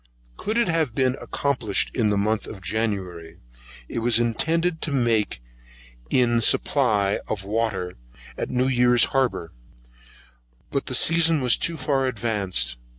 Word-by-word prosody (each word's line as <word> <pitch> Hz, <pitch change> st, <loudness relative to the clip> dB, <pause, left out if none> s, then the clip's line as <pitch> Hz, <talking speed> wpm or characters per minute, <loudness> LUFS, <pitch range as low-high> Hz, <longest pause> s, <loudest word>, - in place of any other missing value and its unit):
Could 215 Hz, -, -3 dB
it 235 Hz, -, +2 dB
have 160 Hz, -8 st, 0 dB
been 130 Hz, -1 st, +1 dB
accomplished 125 Hz, -8 st, -1 dB
in 110 Hz, -4 st, +2 dB
the 105 Hz, -, +1 dB
month 105 Hz, +2 st, 0 dB
of 105 Hz, -, -8 dB
January, 90 Hz, -5 st, -3 dB, 0.5 s
it -, -, -4 dB
was 115 Hz, 0 st, +2 dB
intended 160 Hz, +9 st, 0 dB
to 140 Hz, -6 st, 0 dB
take 105 Hz, -, 0 dB, 0.7 s
in 120 Hz, -2 st, +2 dB
a -, -, +1 dB
supply 105 Hz, -5 st, +2 dB
of 100 Hz, -3 st, -4 dB
water 100 Hz, -4 st, -2 dB, 0.4 s
at -, -, -4 dB
New 125 Hz, +1 st, +1 dB
Year's 125 Hz, -2 st, +4 dB
harbour, 125 Hz, -11 st, -1 dB, 1.2 s
but 140 Hz, -, -2 dB
the 130 Hz, -, -2 dB
season 165 Hz, +3 st, +4 dB
was 125 Hz, -3 st, +3 dB
too 170 Hz, -1 st, -1 dB
far 135 Hz, -1 st, 0 dB
advanced. 105 Hz, -, -1 dB
120 Hz, 145 wpm, -23 LUFS, 105-135 Hz, 1.2 s, Year's